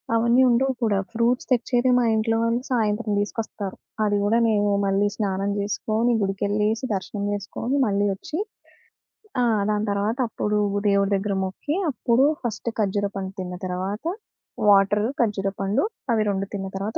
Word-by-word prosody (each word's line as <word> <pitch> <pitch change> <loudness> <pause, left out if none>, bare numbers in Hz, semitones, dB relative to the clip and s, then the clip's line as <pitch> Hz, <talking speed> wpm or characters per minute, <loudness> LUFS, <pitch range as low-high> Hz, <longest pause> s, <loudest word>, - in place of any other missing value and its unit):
అవన్నీ 235 +3 +4
ఉండవు 260 +3 +2
కూడా, 210 -3 +2 0.2
ఫ్రూట్స్ 235 +2 +1
తెచ్చేది 245 +1 +2
మా 245 - +3
ఇంట్లో 225 +1 +1
వాళ్ళు 230 +1 +1
సాయంత్రం 220 -2 0
తీసుకొస్తారు. 205 -2 -4 0.3
అది 205 -1 +2
గూడా 220 +3 +3
మేమే 205 -2 +2
మళ్ళీ 195 +1 +2
స్నానం 195 -1 -1
చేసుకొని, 220 +3 0
గుడికెళ్ళేసి, 205 +3 0
దర్శనం 200 +2 -4
చేసుకొని, 225 +6 -3
మళ్ళీ 200 0 +1
ఒచ్చి 305 - -5 1.0
ఆ! - - +3 0.3
దాని 210 0 0
తర్వాత 205 +4 0
అప్పుడు 210 -1 -1 0.3
దేవుడి 200 0 +2
దగ్గర 200 +1 -1
మొక్కి, 195 +11 -3 0.2
అప్పుడు 245 +1 +2 0.2
ఫస్ట్ 230 0 -3
ఖర్జూర 200 0 +1
పండు 190 0 -4
తిన్న 180 0 -5
తర్వాత, 190 - -3 0.6
వాటర్, 205 +1 +4 0.2
ఖర్జూర 200 -4 0
పండు 205 - +1 0.3
అవి 220 - +2
2 195 0 -2
తిన్న 195 -1 -4
తర్వాత 205 +4 -3
210 Hz, 145 wpm, -24 LUFS, 200-230 Hz, 1.0 s, అవన్నీ